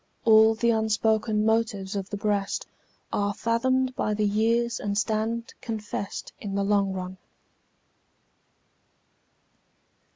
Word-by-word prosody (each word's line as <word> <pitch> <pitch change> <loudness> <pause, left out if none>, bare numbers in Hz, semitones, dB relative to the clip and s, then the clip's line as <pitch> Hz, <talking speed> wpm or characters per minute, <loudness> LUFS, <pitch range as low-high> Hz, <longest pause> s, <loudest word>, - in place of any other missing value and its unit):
All 220 0 +7
the 235 +1 +2
unspoken 220 -1 +1
motives 220 -3 0
of 195 -1 -3
the 205 - -4
breast 200 -1 -1 0.5
Are 205 0 0
fathomed 255 +3 +1
by 215 -2 0
the 210 0 +1
years 230 +3 +1
and 200 -1 -2
stand 220 +2 -1
confess'd 210 -3 -5
In 200 -2 -5
the 200 - +1
long 200 -1 +2
run. 185 0 -5
215 Hz, 110 wpm, -26 LUFS, 200-230 Hz, 0.5 s, All